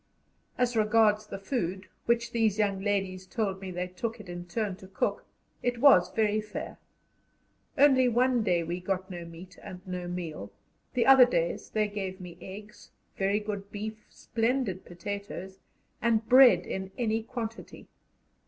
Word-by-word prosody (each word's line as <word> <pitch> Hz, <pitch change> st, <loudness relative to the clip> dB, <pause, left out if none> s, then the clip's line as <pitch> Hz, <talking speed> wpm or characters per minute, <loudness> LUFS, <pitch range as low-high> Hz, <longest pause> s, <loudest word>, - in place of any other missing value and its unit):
As 245 Hz, -1 st, +1 dB
regards 215 Hz, -1 st, +3 dB
the -, -, -6 dB
food, 195 Hz, -3 st, -3 dB, 0.2 s
which 235 Hz, 0 st, +1 dB
these 220 Hz, -3 st, +1 dB
young 200 Hz, -2 st, +1 dB
ladies 195 Hz, -2 st, -1 dB
told 195 Hz, -2 st, -2 dB
me 190 Hz, -, -6 dB
they 180 Hz, 0 st, -3 dB
took 220 Hz, +6 st, -5 dB
it 210 Hz, -, -11 dB
in 175 Hz, 0 st, -7 dB
turn 205 Hz, +1 st, -2 dB
to 190 Hz, -, -13 dB
cook, 190 Hz, -, -2 dB, 0.3 s
it 245 Hz, -1 st, 0 dB
was 235 Hz, -10 st, +6 dB
very 215 Hz, -1 st, +1 dB
fair; 210 Hz, 0 st, -7 dB, 1.0 s
only 265 Hz, -2 st, +6 dB
one 245 Hz, +1 st, +3 dB
day 175 Hz, -5 st, +1 dB
we 170 Hz, +2 st, -3 dB
got 190 Hz, +1 st, -3 dB
no 175 Hz, -1 st, -6 dB
meat 170 Hz, +3 st, -12 dB
and 180 Hz, -, -9 dB
no 180 Hz, -1 st, -4 dB
meal; 165 Hz, -, -5 dB, 0.4 s
the 245 Hz, -, +3 dB
other 265 Hz, -2 st, +9 dB
days 170 Hz, -8 st, -1 dB
they 215 Hz, -1 st, +1 dB
gave 195 Hz, -2 st, -5 dB
me 180 Hz, -2 st, -9 dB
eggs, 205 Hz, +3 st, -11 dB, 0.3 s
very 200 Hz, +2 st, +1 dB
good 205 Hz, -2 st, -5 dB
beef, 215 Hz, +1 st, -6 dB
splendid 230 Hz, -5 st, -1 dB
potatoes, 190 Hz, +1 st, -6 dB, 0.4 s
and 225 Hz, -1 st, +2 dB
bread 245 Hz, -9 st, +7 dB
in 190 Hz, 0 st, -4 dB
any 225 Hz, -2 st, 0 dB
quantity. 230 Hz, -1 st, -7 dB
205 Hz, 155 wpm, -29 LUFS, 185-225 Hz, 1.0 s, other